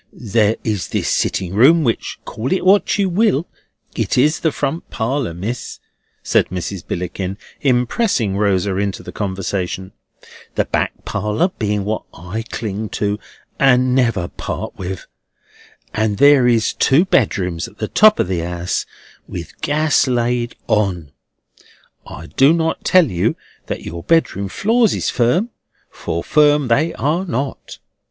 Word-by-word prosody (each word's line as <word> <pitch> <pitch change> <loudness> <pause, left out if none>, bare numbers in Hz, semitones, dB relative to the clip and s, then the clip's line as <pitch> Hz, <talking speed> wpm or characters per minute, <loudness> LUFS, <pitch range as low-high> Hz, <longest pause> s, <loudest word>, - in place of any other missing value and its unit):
"There 110 -1 +1
is 105 -5 -2
this - - -2
sitting 95 -1 0
room—which, 130 +3 +3
call 120 +5 -4
it 190 - 0
what 200 +2 +4
you 200 -1 +2
will, 180 -4 +1 0.5
it - - -1
is 150 +5 +3
the 160 - +1
front 145 +4 -3
parlour, 115 -1 -2
Miss," 115 +8 -5 0.4
said - - +2
Mrs. 90 +1 -4
Billickin, 90 +2 -4 0.2
impressing 125 - +1
Rosa 100 -1 +1
into 100 -1 -2
the - - -8
conversation: 95 -1 -3 0.6
"the - - +1
back - - -2
parlour 105 - 0
being 105 - -2
what 110 +1 -1
I 90 +7 -5
cling 110 -1 -4
to 105 0 -1 0.4
and 130 -2 +4
never 115 -9 +1
part - - -6
with; 95 -1 -6 0.9
and 110 -1 0
there 140 0 +6
is 115 -2 +2
two 145 +7 +3
bedrooms 90 - 0
at 105 - -17
the 110 - -3
top 215 - +5
of - - +1
the 90 -2 -1
'ouse 85 +1 -3 0.4
with 85 -2 -8
gas 150 -2 +2
laid 120 -1 0
on. 95 -9 0 1.0
I 80 - -9
do 135 - +4
not 165 -1 -1
tell 185 -2 +5
you 85 -1 0 0.3
that - - -4
your 85 0 -6
bedroom 100 - +1
floors 225 - +2
is - - -1
firm, 165 - +1 0.4
for 85 0 -4
firm 150 -3 +3
they 155 +8 +2
are 155 +7 0
not. 140 -6 -4
115 Hz, 145 wpm, -19 LUFS, 95-145 Hz, 1.0 s, there